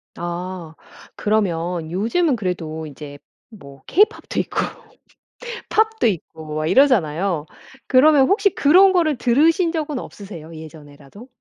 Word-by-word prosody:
아 175 -1 -6 0.4
그러면 175 -6 -1
요즘은 245 - +1
그래도 165 -6 -4
이제 145 0 -10 0.3
뭐 140 - -14
케이팝도 420 +4 +1
있고 - - -5 1.1
팝도 440 - +2
있고 160 -5 -5
막 155 0 -2
이러잖아요. 185 - +2 0.4
그러면 275 +1 +5
혹시 400 0 +3
그런 370 +7 +5
거를 315 -7 +1
들으신 320 +8 +2
적은 300 -5 -3
없으세요, 170 -6 -10
예전에라도? 155 - -13
195 Hz, 275 characters per minute, -20 LUFS, -, 1.1 s, 그러면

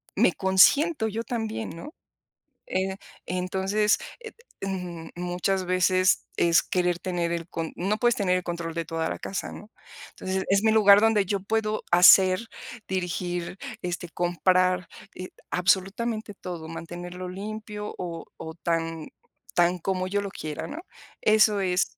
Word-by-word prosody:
me - - +4
consiento 220 - +4
yo 220 +2 -3
también, 225 -1 -3
¿no?, 290 - -9 0.7
eh, 190 +1 -1 0.3
entonces, 190 +4 +1 0.2
eh, 450 - -8 0.3
mm, 180 -4 -5
muchas 180 +2 -1
veces 185 +1 +2
es 170 0 +4
querer 180 -1 0
tener 175 -2 -2
el 170 0 -4
con 165 -1 -4
No 200 +4 -1
puedes 240 0 +3
tener 185 -3 +1
el 180 - -4
control 170 -1 -4
de 165 -1 -2
toda 165 0 -2
la - - -5
casa, 195 - -4
¿no? 210 +2 -11 0.4
Entonces, 190 0 -3
es 200 +1 +3
mi 220 - +4
lugar, 205 -2 +7
donde 220 -2 +3
yo 195 +1 -1
puedo 215 +1 -1
hacer, 185 +4 +7 0.4
dirigir, 180 -1 -3 0.2
este, 175 0 -4
comprar, 180 +1 +1 0.3
eh, 185 0 -7 0.2
absolutamente 205 +4 0
todo, 170 -4 -7
mantenerlo 175 +2 -7
limpio 210 +2 -6
o 170 -2 -6
o 160 - -7
tan 165 -1 -2 0.4
tan 175 +1 +3
como 185 +1 -1
yo 205 +1 0
lo 200 -1 -5
quiera, 155 -1 -5
¿no? 315 - -7 0.4
Eso 215 -1 +4
es 185 -1 +2
185 Hz, 145 wpm, -26 LUFS, 175-205 Hz, 0.7 s, lugar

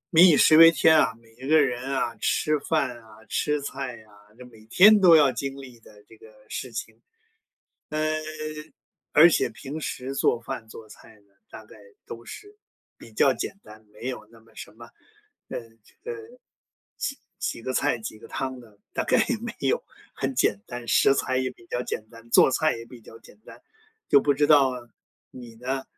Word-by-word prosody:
民 175 +3 +9
以 160 -5 +5
食 155 - +6
为 165 0 +10
天 160 -1 +4
啊， 115 -7 +3
每 115 -1 -23
一 - - -5
个 155 0 +6
人 125 -4 0
啊， 120 -3 -1
吃 150 +7 0
饭 140 -6 -2
啊、 110 -1 -18
吃 150 0 -1
菜 135 -3 -5
啊， 105 -1 -23 0.2
这 125 - -12
每 110 -3 -17
天 205 - +7
都 175 -3 +8
要 145 -4 +5
经 135 +3 -5
历 130 -3 -12
的 105 -2 -19
这 - - -17
个 440 - -16 0.2
事 - - -6
情。 - - -8 0.9
嗯， 155 0 -1 1.0
而 165 +3 +7
且 - - +1
平 145 +3 -8
时 135 -2 -5
做 120 - +1
饭、 115 -1 -7
做 110 0 -12
菜 105 - -16
的， 105 -1 -26 0.2
大 110 - -12
概 110 - -17 0.3
都 115 0 -10
是 415 - -12 0.4
比 - - -15
较 - - +3
简 200 - -6
单， 110 0 -16
没 110 +4 -7
有 125 -5 -6
那 115 - -18
么 115 - -24
什 - - -10
么 115 +2 -14 0.6
呃， - - -5 0.4
呃， 475 - -5 0.8
几 275 - -4 0.2
几 115 - -4
个 130 - -3
菜 - - +1
几 110 0 -8
个 - - -13
汤 130 -1 -5
的， 110 -4 -18
大 - - -2
概 - - +3
也 - - 0
没 - - -7
有。 - - 0 0.3
很 135 0 -4
简 105 -5 +1
单， 120 -1 -8
食 135 - +4
材 130 -1 -1
也 130 -1 -1
比 115 - -21
较 125 0 -3
简 110 - -5
单， 115 0 -16
做 - - +6
菜 155 +1 +1
也 115 - -9
比 120 0 -14
较 110 - -15
简 - - -19
单。 - - -14 0.5
就 140 - +6
不 145 +1 +1
知 145 - +1
道 140 -4 +5 0.6
你 120 -2 -12
呢， 130 +3 -4
130 Hz, 210 characters per minute, -25 LUFS, 115-150 Hz, 1.0 s, 为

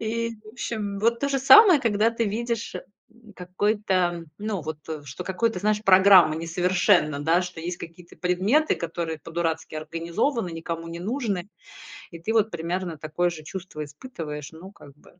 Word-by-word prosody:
И, 230 +1 -2
в - - -14
общем, 215 -4 -4
вот 230 +2 +2
то 280 - 0
же 275 -1 0
самое, 355 - +8
когда 220 -1 +2
ты 230 0 -1
видишь, 230 +2 -3 0.4
м, 230 -2 -18
какой-то 185 -2 -1
ну, 210 -2 -3
вот 155 0 -5 0.3
что 135 -1 -8
какой-то, 195 +2 -1
знаешь 210 +2 0
программа 185 -5 +7
несовершенна, 170 -2 +2
да. 165 +4 +2
Что 180 -2 -7
есть 175 +2 -4
какие-то 170 +1 -12
предметы, 195 - +2
которые 165 -1 -4
по-дурацки 165 +1 -3
организованы, 170 - -2
никому 165 0 -5
не 165 0 -6
нужны, 205 -3 -2 0.6
и 170 - -9
ты 215 +7 -2
вот 220 -1 +2
примерно 170 0 -3
такое 155 +4 -1
же 160 -3 -8
чувство 170 -1 -7
испытываешь, 150 - -8
ну, 170 +4 -12
как 145 -8 -16
бы. 175 - -22
180 Hz, 160 wpm, -25 LUFS, 165-220 Hz, 0.6 s, самое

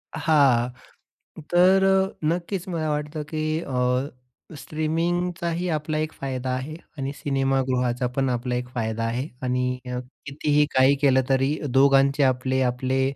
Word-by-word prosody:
हां. 140 -6 +3 0.8
तर 185 +2 +5 0.4
नक्कीच 175 +3 -2
मला 160 -3 -2
वाटतं 150 +1 -3
की 155 -1 -3 0.2
अ, 125 0 0 0.5
स्ट्रीमिंगचाही 170 +3 -2
आपला 155 +1 -3
एक 155 0 -2
फायदा 130 -1 -4
आहे 140 +5 -5 0.2
आणि 135 +1 -3
सिनेमागृहाचा 135 -3 0
पण 135 -1 +1
आपला 125 0 -2
एक 125 0 -3
फायदा 115 -1 -2
आहे 120 +5 -2 0.2
आणि 125 0 -1
अ, 125 0 -3 0.3
कितीही 145 +1 +1
काही 130 +2 +5
केलं 130 -2 +4
तरी 135 +3 +2 0.2
दोघांचे 140 +1 +4
आपले 130 0 +1
आपले 130 +1 0
135 Hz, 130 wpm, -24 LUFS, 125-155 Hz, 0.8 s, तर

